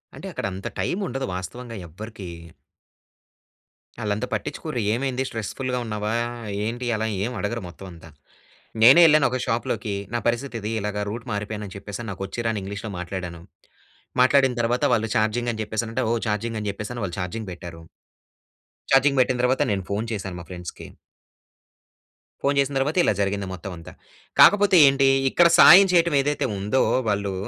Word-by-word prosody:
అంటే, - - -8
అక్కడ - - -5
అంత 95 +2 -6
టైముండదు. 135 -9 -2
వాస్తవంగా 115 +6 -7
ఎవ్వరికీ. 105 +3 -9 1.7
ఆళ్ళంత 105 +2 -1
పట్టించుకోరు. 125 +5 -4
ఏమైంది? 130 +1 -1
స్ట్రెస్‌ఫుల్‌గా 125 +3 -3
ఉన్నావా? 105 0 -3 0.5
ఏంటి? 120 +3 -4
అలా 110 +1 -1 0.2
ఏమి 120 +2 -3
అడగరు, 115 +2 -3
మొత్తం 95 +3 -12
అంతా. 85 -1 -13 0.7
నేనే 135 +9 +9
ఎల్లాను 155 -1 +5
ఒక 130 - -1
షాప్‌లోకి. 115 -2 -2 0.2
నా 120 - +2
పరిస్థితి 120 +1 -2
ఇది 110 +2 -3
ఇలాగ 105 0 -3
రూట్ 115 +2 -6
మారిపోయాను, 105 +1 -4
అని 95 - -10
చెప్పేసి 100 +2 -7
అని 105 - -5
నాకు 95 +1 -6
వచ్చి 120 +4 -5
రాని 110 -3 -1
ఇంగ్లీష్‌లో 100 +2 -6
మాట్లాడాను. 90 -2 -6 0.8
మాట్లాడిన 130 -1 +4
తర్వాత, 120 +4 0
వాళ్ళు 110 -1 -1
చార్జింగ్ 110 +3 +1
అని 110 - -6
చెప్పేసి 110 +2 -3
అంటే, 115 - -1
ఓ - - +2 0.2
చార్జింగ్ 110 +2 -2
అని 105 - -3
చెప్పేసి 105 +4 -6
వాళ్ళు 85 - -5
చార్జింగ్ 105 +3 -5
పెట్టారు. 85 -1 -9 1.1
ఛార్జింగ్ 135 +1 +4
పెట్టిన 125 0 +1
తర్వాత, 130 +1 +2
నేను 95 -2 -1
ఫోన్ 105 +3 -1
చేశాను 95 -3 -5
మా 85 - -10
ఫ్రెండ్స్‌కి... 90 -1 -8 1.6
ఫోన్ 140 0 +2
చేసిన 140 0 0
తర్వాత, 150 +6 -1
ఇలా - - +3
జరిగింది 100 0 -1
మొత్తం 95 +2 -7
అంతా. 85 - -11 0.5
కాకపోతే 205 -1 +7
ఏంటి, 135 0 +3 0.2
ఇక్కడ 175 +4 +5
సాయం 195 +2 +9
చేయటం 170 -3 +3
ఏదైతే 145 +1 -1
ఉందో, 105 +7 +1 0.3
వాళ్ళు 100 -1 -1
110 Hz, 155 wpm, -24 LUFS, 100-130 Hz, 1.7 s, నేనే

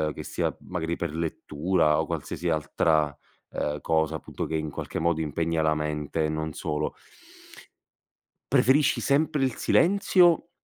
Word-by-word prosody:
che - - -6
sia, - - -1 0.2
magari, 85 -2 -2
per 85 -3 -4
lettura 80 0 0
o - - -4
qualsiasi 85 - -3
altra, 75 -1 +1 0.4
ehm, 75 0 -2
cosa, 80 -1 +1
appunto, - - -5
che, 80 - -3
in 80 -1 -2
qualche - - -5
modo, 80 -1 +1
impegna 80 +2 -1
la 80 0 +2
mente 75 +1 -2
e - - -1
non 80 0 -3
solo 75 +1 -3 1.6
preferisci 140 +3 +4
sempre 150 0 +1
il 130 -3 0
silenzio 175 -2 +3
80 Hz, 140 wpm, -26 LUFS, 75-95 Hz, 1.6 s, preferisci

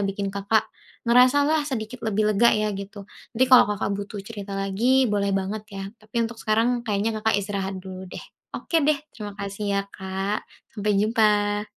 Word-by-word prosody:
bikin 195 0 -2
Kakak 200 +2 +1 0.4
ngerasa 250 +4 +5
lah 310 +1 +2
sedikit 245 -2 -5
lebih 215 0 +1
lega 235 +4 +5
ya 215 0 0
gitu. 200 +1 -7 0.3
Nanti 260 - +5
kalau 250 - +8
Kakak 205 -1 -1
butuh 200 +1 -5
cerita 200 -2 -7
lagi, 225 +7 +2
boleh 200 -1 +1
banget 200 +2 -3
ya 195 - -4 0.2
tapi 220 +2 -2
untuk 225 0 -7
sekarang 230 +3 +1
kayaknya 215 -1 -1
Kakak 220 -1 +2
istirahat 195 -1 -3
dulu 185 0 -8
deh. - - -8 0.3
Oke 330 - 0
deh 305 - +5 0.2
terima 210 -2 -8
kasih 200 +1 -5
ya, 200 - +2
Kak, 190 +2 -4 0.2
sampai 210 -1 -1
jumpa. 210 0 +2
210 Hz, 175 wpm, -24 LUFS, 200-225 Hz, 0.4 s, kalau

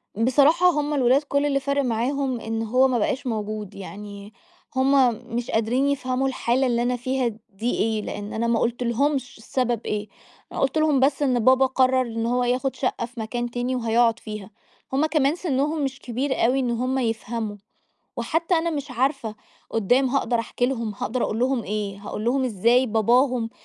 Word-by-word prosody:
بصراحة 285 +10 +4
هم 295 -1 -1
الولاد 265 +1 +3
كل 280 0 0
اللي 275 -1 +1
فارق 280 +1 0
معاهم 255 +2 -1
إن 225 0 -3
هو 255 +4 +3
ما 245 -3 0
بقاش 260 +5 -1
موجود، 215 -2 -4
يعني 200 +1 -9 0.4
هم 260 -2 +4 0.2
مش 240 0 -2
قادرين 240 +5 +1
يفهموا 260 -1 0
الحالة 260 0 +1
اللي 240 -1 +1
أنا 250 +1 +1
فيها 255 +1 -1 0.2
دي 220 +5 -2
إيه، 220 -1 +1
لإن 205 0 -6
أنا 230 +1 -1
ما 235 -1 +2
قلتلهمش 245 +3 0
السبب 240 0 -1
إيه، 210 0 -2 0.4
أنا - - -5
قُلت 270 +2 +1
لهم 310 -3 +3
بس 275 +2 +2
إن 255 -4 +2
بابا 260 +3 +5
قرر 260 0 +3
إن 230 -2 -3
هو 245 +1 +1
ياخد 255 +2 0
شقّة 250 -3 -1
في 240 0 -12
مكان 240 +2 -3
تاني 245 +2 -2
وهيقعد 230 -1 +2
فيها. 210 -2 -7 0.4
هم 290 +4 +3
كمان 305 -1 +2
سنهم 300 -2 -1
مش 270 0 -3
كبير 260 +2 -1
أوي 255 +3 +2
إن 250 -2 0
هم 255 +3 -1
يفهموا، 225 -2 -2 0.6
وحتّى 325 +9 0
أنا 335 +1 +1
مش 295 -2 -4
عارفة 255 -3 -1 0.4
قُدّام 245 +5 +2
هاقدر 245 -2 0
أحكي 245 +1 -1
لهم، 230 -5 -2
هاقدر 245 +2 -2
أقول 215 - -2
لهم 250 -1 +1
إيه؟ 205 -1 -3
هاقول 210 +1 -6
لهم 260 +3 +1
إزاي 240 +3 +3
باباهم 235 +2 +2
245 Hz, 180 wpm, -24 LUFS, 225-270 Hz, 0.6 s, بابا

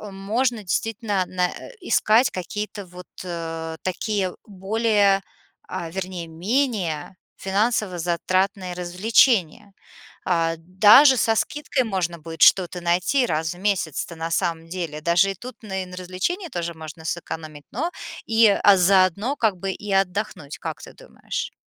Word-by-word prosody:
можно, 215 +5 -1
действительно, 205 +1 -1
на 180 0 0
э, - - -10
искать 240 - +3
какие-то 205 +2 -5
вот 180 0 -12 0.7
такие, 190 0 -2
более, 205 0 +1 0.5
а, 180 -2 -5
вернее 185 -1 -5
менее 185 - -1 0.2
финансово-затратные 190 -2 0
развлечения. 195 - +2 0.5
А, 165 -2 +1
даже 210 - +7
со 225 -1 +2
скидкой 290 +2 -1
можно 180 -5 -2
будет 165 +1 -9
что-то 180 -1 +5
найти 180 +10 +2
раз 160 -3 -1
в - - -14
месяц-то, 175 -5 -1
на 165 +1 -3
самом 165 -2 -1
деле. 165 -4 -4
Даже 175 +4 +3
и - - -7
тут 245 +6 -9
на 190 -3 -3
и - - -9
на 180 0 -10
развлечении 185 - -3
тоже 170 - -4
можно 160 0 -10
сэкономить, 155 -3 -5
но 325 +10 -2 0.3
и, 225 0 +5
а, 200 -1 +5
заодно 190 - +3
как 215 -5 +1
бы 195 +2 -3
и 210 +2 -7
отдохнуть, 195 -5 -1
как - - -6
ты - - -11
думаешь? - - -6
190 Hz, 135 wpm, -23 LUFS, 175-215 Hz, 0.7 s, даже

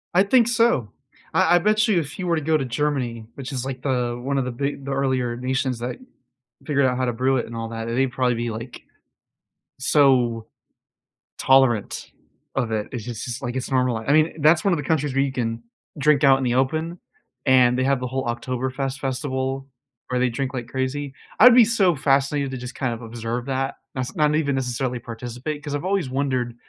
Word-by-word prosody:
I 180 +2 +5
think 230 +3 +4
so. 230 - +2 0.4
I 175 - +4
I - - +5
bet 215 +3 +2
you 205 -5 +3
if 150 -3 -6
you 180 - -3
were 170 - +2
to 160 - -1
go 155 +1 +2
to 135 - -2
Germany, 125 -4 -2
which 135 0 -7
is, 130 -2 -3
like, 135 -1 -5
the 125 -3 -1
one 140 +2 -1
of 135 - 0
the 125 - -3
big 140 +2 -3
the 140 - -4
earlier 130 -3 0
nations 130 0 -1
that 120 +1 -4 0.7
figured 140 -2 +2
out 125 -1 +1
how 130 - 0
to 120 - -1
brew 130 +3 +1
it 120 - -1
and 115 - -8
all 115 0 -4
that 115 0 -5
and 115 +1 -2
they'd 135 -1 +2
probably 125 -1 +1
be, 120 +1 -2
like, 115 +2 -7 1.0
so 130 -5 +3 0.9
tolerant 130 -5 +2 0.4
of 125 -4 -1
it. 105 -1 -1
It's 120 -4 -5
just 120 -1 -5
it's 125 +1 -5
like 120 -1 -4
it's 130 +1 -4
normal 125 -3 +2
I 110 - -7
I 140 - +2
mean, 155 +1 +2
that's 155 +3 +5
one 195 - +4
of - - +1
the 145 - -4
countries 150 -3 0
where 135 +1 +2
you 140 - -1
can 115 -3 -3 0.3
drink 145 0 +3
out 135 -1 +6
in 135 - -3
the 120 -1 +1
open, 160 +6 0 0.5
and 125 -2 +5
they 130 - +1
have 135 0 +2
the 125 - -3
whole 130 +1 -3
Oktoberfest 130 +3 -3
festival 135 0 -3 0.4
where 125 - 0
they 125 0 +2
drink 130 +3 -3
like 125 -3 -4
crazy. 135 +2 -3 0.3
I'd 250 -1 +9
be 245 -2 +8
so 200 -6 +2
fascinated 140 0 +1
to 130 - -4
just 125 +1 -8
kind 130 -3 -1
of 115 - -8
observe 115 +1 -4
that. 135 0 -2 0.2
That's 130 -1 -4
not 150 -1 +2
even 145 -3 +1
necessarily 125 -1 -2
participate 125 +6 -6
'cause 145 -1 -5
I've 145 - -4
always 190 -7 0
wondered, 130 -3 -1
130 Hz, 220 wpm, -23 LUFS, 125-145 Hz, 1.0 s, I'd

